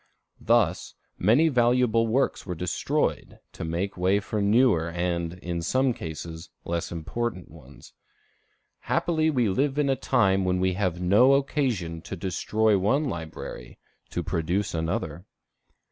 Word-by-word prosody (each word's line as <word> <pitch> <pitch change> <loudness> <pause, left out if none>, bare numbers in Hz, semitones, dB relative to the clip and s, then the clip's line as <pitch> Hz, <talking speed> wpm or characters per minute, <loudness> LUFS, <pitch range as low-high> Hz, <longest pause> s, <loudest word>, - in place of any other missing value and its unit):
Thus, - - +1 0.2
many 120 - +4
valuable 120 -4 +3
works 130 +5 0
were 90 -2 -5
destroyed 90 +2 -2
to - - -7
make 85 +5 -2
way 95 +3 +2
for 105 0 -3
newer, 100 -5 +3
and, 85 0 -2
in 85 -1 -4
some 130 +8 +1
cases, 80 -1 -7 0.2
less 85 0 -3
important 90 +4 -4
ones. - - -15 0.9
Happily 160 -2 0
we 125 -7 +1
live 135 +8 0
in 145 -2 +2
a - - +2
time 100 -7 +2
when 90 0 +1
we 95 0 +1
have 90 -2 -1
no 105 +9 +5
occasion 120 - -1
to 95 - -7
destroy 100 +4 +1
one 130 +11 +2
library 80 - -7 0.3
to - - -3
produce 90 +5 -1
another. 80 +1 -3
95 Hz, 135 wpm, -26 LUFS, 85-120 Hz, 0.9 s, no